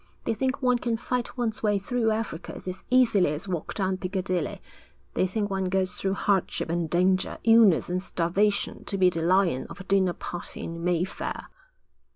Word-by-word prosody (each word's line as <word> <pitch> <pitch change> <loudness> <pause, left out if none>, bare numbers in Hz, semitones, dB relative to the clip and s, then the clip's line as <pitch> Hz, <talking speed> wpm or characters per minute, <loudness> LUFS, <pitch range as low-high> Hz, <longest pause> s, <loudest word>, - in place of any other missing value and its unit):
They - - 0
think 260 +4 -2
one 250 -1 +3
can 235 -2 -1
fight 250 +2 -3
one's 230 -3 -1
way 210 -2 +2
through 225 +3 0
Africa 215 -6 -3
as 185 0 -7
easily 230 -11 +4
as 155 +7 -6
walk 175 -4 -4
down 190 -2 0
Piccadilly. 185 -3 -2 0.5
They 185 - +1
think 205 +1 -2
one 190 -1 -1
goes 185 0 0
through 195 0 -1
hardship 190 -4 0
and 170 -1 -1
danger, 185 +3 +2
illness 225 -6 +5
and 180 +1 -1
starvation, 195 +4 0
to 195 - -2
be 185 -1 +4
the 165 -1 -2
lion 175 -5 +2
of 170 +3 -10
a - - -7
dinner 190 -2 +2
party 175 0 -5
in 165 0 -6
Mayfair.' 180 +1 -2
190 Hz, 180 wpm, -26 LUFS, 180-215 Hz, 0.5 s, illness